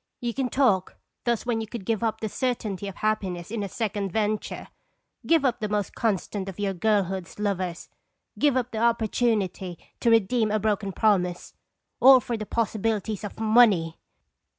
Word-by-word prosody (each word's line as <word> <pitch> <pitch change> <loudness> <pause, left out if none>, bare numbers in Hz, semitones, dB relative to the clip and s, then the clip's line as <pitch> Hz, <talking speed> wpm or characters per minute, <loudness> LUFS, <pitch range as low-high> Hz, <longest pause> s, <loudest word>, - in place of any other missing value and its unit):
You 240 -1 -2
can 260 0 -1
talk 215 -10 +2 0.3
thus 235 -1 0
when 235 -2 0
you 220 - -5
could 215 -3 -7
give 225 +1 0
up 220 -1 -1
the 220 - -1
certainty 215 -5 -2
of 195 - -7
happiness 195 -4 -2
in 225 -2 -2
a 200 - -3
second 205 -3 -2
venture, 215 +1 -2 0.6
give 325 -4 +4
up 250 -3 +1
the 215 - -2
most 205 -2 -1
constant 200 -2 -2
of 190 - -9
your 200 -1 0
girlhood's 190 -2 -1
lovers, 185 -4 -2 0.5
give 285 -3 +3
up 250 -1 -1
the 220 - -3
opportunity 220 -5 0 0.2
to 235 - +2
redeem 225 0 +3
a 215 - +1
broken 205 -2 -1
promise 180 -4 +1 0.5
all 265 0 +8
for 240 -1 -3
the 215 -2 -5
possibilities 220 -2 -1
of 205 - -7
money! 215 -8 +4
215 Hz, 170 wpm, -26 LUFS, 195-230 Hz, 0.6 s, all